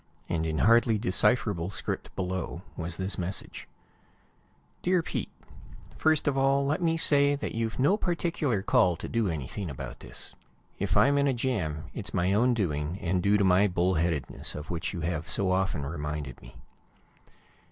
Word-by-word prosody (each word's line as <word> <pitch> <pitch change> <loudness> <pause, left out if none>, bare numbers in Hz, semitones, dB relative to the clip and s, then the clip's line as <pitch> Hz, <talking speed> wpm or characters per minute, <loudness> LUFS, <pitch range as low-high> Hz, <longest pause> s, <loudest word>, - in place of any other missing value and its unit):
And 80 -1 -1
in 80 -1 -2
hardly 115 +2 +4
decipherable 100 -3 +2
script, 95 - -4
below, 90 -1 -3
was 85 0 -4
his 95 0 -2
message: 90 +2 -5 1.1
Dear 180 -1 +2
Pete: - - -3 0.7
First 155 -2 +2
of 145 - +2
all, 135 +1 +3
let 155 +6 0
me 165 -1 +2
say 145 -2 +4
that 145 - -4
you've 115 -1 -2
no 145 +11 +3
particular 165 - -1
call 90 -2 +3
to - - -7
do 115 -3 0
anything 80 +5 -4
about 70 - -7
this. - - -7 0.5
If - - 0
I'm 140 +1 +5
in 140 - +3
a 135 - +2
jam, 95 - -2
it's 105 -2 -5
my 90 +1 +2
own 120 +4 +3
doing, 80 -4 -1
and 90 -1 0
due 100 +3 +3
to 100 - +2
my 95 +2 +5
bull 90 0 +1
headedness, 80 -6 -1
of 75 +2 -7
which 85 0 -2
you 90 - -5
have 80 -1 -3
so 95 -2 0
often 95 -6 0
reminded 75 -3 -5
me. - - -14
95 Hz, 170 wpm, -28 LUFS, 85-125 Hz, 1.1 s, I'm